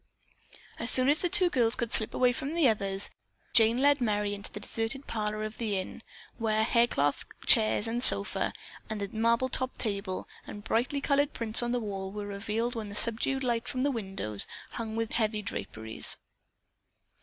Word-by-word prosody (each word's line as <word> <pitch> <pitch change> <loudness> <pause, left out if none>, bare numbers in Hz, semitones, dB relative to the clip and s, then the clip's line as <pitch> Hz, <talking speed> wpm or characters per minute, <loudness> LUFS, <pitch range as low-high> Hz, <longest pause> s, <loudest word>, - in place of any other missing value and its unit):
As 230 - +1
soon 255 +1 +5
as 300 +2 +4
the 355 - +1
two 360 -1 +6
girls 235 -5 +2
could 235 -2 -3
slip 220 - 0
away 250 -1 +4
from 275 +5 -4
the 330 -5 +4
others, 200 -3 0 0.4
Jane 230 0 +5
led 285 +1 +3
Merry 210 -3 0
into 200 0 -6
the - - -7
deserted 225 +6 -3
parlor 215 -1 -2
of 215 0 -6
the 215 -4 -1
inn, 185 +4 -6 0.4
where 220 -1 +1
hair 235 +1 +3
cloth 145 -9 0 0.2
chairs 215 -2 +4
and 230 +2 -2
sofa, 200 -5 +4 0.4
a 210 -2 -3
marble 230 +3 +2
topped 260 0 -1
table, 200 -4 -3 0.2
and 205 - -8
bright 225 +3 0
colored 285 0 +2
prints 225 0 +3
on 240 0 -1
the 245 - 0
wall 195 -3 -5
were 205 0 -5
revealed 215 +4 -3
in 215 -2 -5
the 200 - -8
subdued 235 +5 0
light 235 -2 -1
from 255 0 -2
windows 195 - -2 0.2
hung 225 -2 -5
with 225 -1 -2
heavy 215 -2 0
draperies. 110 - -5
225 Hz, 180 wpm, -29 LUFS, 205-245 Hz, 0.4 s, two